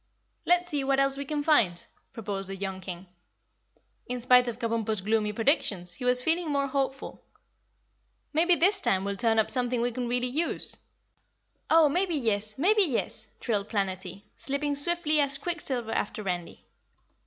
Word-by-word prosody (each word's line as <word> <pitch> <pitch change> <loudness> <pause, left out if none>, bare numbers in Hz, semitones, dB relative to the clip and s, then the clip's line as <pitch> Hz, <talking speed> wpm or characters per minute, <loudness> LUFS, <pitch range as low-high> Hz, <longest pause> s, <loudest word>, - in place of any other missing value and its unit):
"Let's 355 0 +2
see 290 -2 -1
what 270 0 +1
else 275 0 +3
we 280 +1 -5
can 295 +1 -2
find," 220 - +2 0.3
proposed 195 -3 -4
the 195 - -4
young 190 -1 -5
King. 180 -1 -7 1.0
In 250 0 -3
spite 250 0 +5
of 235 -2 -4
Kabumpo's 225 -3 -2
gloomy 210 +1 0
predictions, 210 - +1
he 250 - -5
was 250 0 +6
feeling 325 +2 0
more 280 -1 +1
hopeful. 275 -1 -3 1.1
"Maybe 345 +3 +4
this 385 +4 +3
time 190 - +1
we'll 200 0 -2
turn 225 +1 +2
up 220 - +3
something 250 -1 0
we 240 +1 0
can 245 +1 -4
really 245 +1 0
use." 300 +7 -2 0.9
"Oh, 320 -1 +6
maybe 350 +3 0
yes, 215 -5 -2
maybe 410 +9 +3
yes!" 290 - -2
trilled 210 -3 -2
Planetty, 195 -1 -3
slipping 285 +1 -2
swiftly 310 0 +1
as 280 -1 +2
quicksilver 270 -8 -3
after 210 +1 -2
Randy. 180 -3 -5
250 Hz, 160 wpm, -27 LUFS, 210-295 Hz, 1.1 s, was